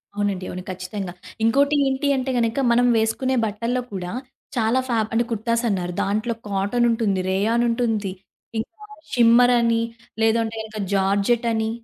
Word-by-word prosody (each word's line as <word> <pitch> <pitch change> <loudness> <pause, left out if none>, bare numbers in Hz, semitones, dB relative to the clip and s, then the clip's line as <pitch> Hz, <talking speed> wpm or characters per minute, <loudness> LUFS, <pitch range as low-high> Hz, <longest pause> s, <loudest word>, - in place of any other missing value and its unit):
అవునండి. 200 -3 -1
అవును. 180 0 -6
ఖచ్చితంగా. 185 0 -5 0.3
ఇంకోటి 280 +6 +3
ఏంటి 265 +2 0
అంటే 260 0 -1
గనుక 230 +3 +1
మనం 245 +1 +4
వేసుకునే 240 +4 0
బట్టల్లో 230 +4 -2
కూడా 180 -2 -4 0.5
చాలా 230 +2 +2
ఫాబ్ 220 -2 +1
అంటే 235 +1 +3
కుర్తాస్ 230 +2 0
అన్నారు. 180 -3 -2
దాంట్లో 215 +4 -1
కాటనుంటుంది, 205 0 +1
రేయానుంటుంది, 225 0 +1 0.5
ఇంకా 335 - -6 0.3
షిమ్మర్ 240 +1 +6
అని, 230 -1 +2 0.4
లేదంటే 225 0 +2
గనుక 220 0 -8 0.2
జార్జెట్ 200 +5 +2
అని, 220 0 0
225 Hz, 130 wpm, -22 LUFS, 200-240 Hz, 0.5 s, షిమ్మర్